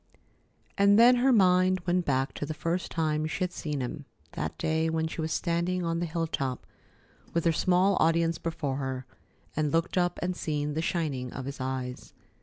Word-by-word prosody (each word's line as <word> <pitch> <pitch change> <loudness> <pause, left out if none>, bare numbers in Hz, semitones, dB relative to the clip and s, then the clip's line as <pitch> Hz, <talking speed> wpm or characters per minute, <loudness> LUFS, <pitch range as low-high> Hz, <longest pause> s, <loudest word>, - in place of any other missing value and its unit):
And 200 +1 +6
then 245 +2 +7
her 260 +2 +4
mind 185 -3 +4
went 180 0 +1
back 135 0 0
to - - -4
the 155 - -4
first 170 +3 -2
time 155 -1 0
she 170 +4 -2
had 180 - -1
seen 150 -5 -4
him, 130 +3 -5 0.3
that 75 +1 -4
day 160 +1 0
when 160 0 0
she 160 - -5
was 160 0 -2
standing 175 +1 0
on 165 0 -1
the 175 - -1
hilltop 160 -6 -2 0.7
with, 170 - +1
her 165 - +5
small 185 +4 +3
audience 165 +1 +2
before 150 -5 -3
her, 130 -2 -4 0.5
and 155 0 +1
had 145 - -3
looked 165 +2 +1
up 175 0 0
and 180 0 -1
seen 150 -3 -2
the 160 - -1
shining 145 -8 -2
of 130 - -6
his 140 +1 -6
eyes. 130 -1 -5
165 Hz, 195 wpm, -28 LUFS, 145-180 Hz, 0.7 s, then